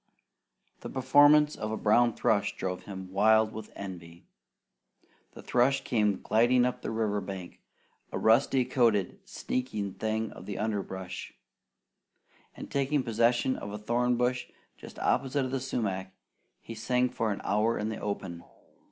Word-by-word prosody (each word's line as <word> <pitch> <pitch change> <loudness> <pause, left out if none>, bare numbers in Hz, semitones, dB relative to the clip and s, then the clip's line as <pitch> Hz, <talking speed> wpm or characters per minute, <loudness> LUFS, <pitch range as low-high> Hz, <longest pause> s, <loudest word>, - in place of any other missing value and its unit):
The - - -7
performance 145 +3 +5
of 110 0 -4
a 110 - -2
brown 120 +2 +3
thrush 105 -2 +1
drove 90 -1 -4
him 95 -2 -8
wild 110 +2 +4
with 110 0 -8
envy. 85 -3 -9 1.1
The - - -11
thrush 125 +3 +2
came 105 -4 0
gliding 120 +3 +3
up 125 - -2
the - - -4
river 110 -2 -1
bank, 95 -3 -8 0.5
a - - -3
rusty 125 +3 +3
coated, 115 -7 +1
sneaking 110 -6 -3
thing 110 0 -2
of - - -12
the 100 - -4
underbrush, 95 -4 -4 1.2
and - - -9
taking 140 0 +1
possession 120 +2 +2
of 100 - -7
a 105 - -5
thorn 120 +3 0
bush 125 +1 0 0.3
just - - -12
opposite 135 +1 0
the 135 - -1
sumac, 100 -8 -3 0.5
he 115 - -8
sang 125 +2 +1
for 115 -3 -1
an 100 - -3
hour 105 +3 +1
in 105 - -2
the 110 - -5
open. 95 -4 -4
110 Hz, 145 wpm, -29 LUFS, 100-125 Hz, 1.2 s, performance